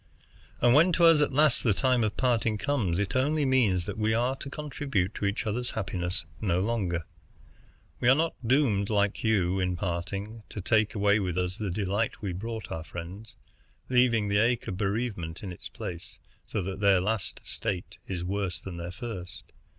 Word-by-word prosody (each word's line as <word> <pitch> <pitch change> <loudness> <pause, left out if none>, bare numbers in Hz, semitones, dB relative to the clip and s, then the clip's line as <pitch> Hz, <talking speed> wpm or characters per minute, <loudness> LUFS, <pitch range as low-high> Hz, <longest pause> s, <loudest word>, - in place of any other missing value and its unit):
And 120 0 +5
when 165 +6 +6
to 170 - +5
us 165 -2 +7
at 145 - +2
last 145 -1 +3
the 110 -5 +3
time 130 -1 +2
of 105 -1 -1
parting 115 -4 +1
comes, 105 -10 0
it 100 +2 -1
only 145 +3 +2
means 110 -10 +3
that - - -5
we 110 +1 +2
are 125 +3 +1
to 135 - -7
contribute 140 - -2
to - - -3
each 100 +4 -1
other's 120 +3 -1
happiness 90 -3 -3 0.2
no 90 -5 +1
longer. 95 -6 -1 0.9
We 120 - +3
are 130 - +7
not 165 +2 +1
doomed, 115 -6 +2
like 100 -2 +1
you, 95 -4 +2
in 90 -1 0
parting, 100 +5 -4
to - - -6
take 110 +2 +2
away 105 +1 +3
with 90 -3 -2
us 90 +2 -1
the 105 -3 -2
delight 100 +4 -1
we 100 -4 -3
brought 110 +4 -5
our 80 - -4
friends, 90 +7 -8 0.5
leaving 125 -4 +3
the 100 0 +2
ache 115 +1 +2
of 95 - -3
bereavement 100 -4 -2
in 95 - -5
its 85 - -8
place, 85 -1 -7 0.3
so 105 - -2
that 95 +2 -4
their 100 -2 +5
last 105 +2 -2
state 90 -2 -4
is 90 -2 -3
worse 95 -1 -2
than 95 -3 -7
their 85 0 -5
first. 90 -4 -7
105 Hz, 190 wpm, -28 LUFS, 95-120 Hz, 0.9 s, us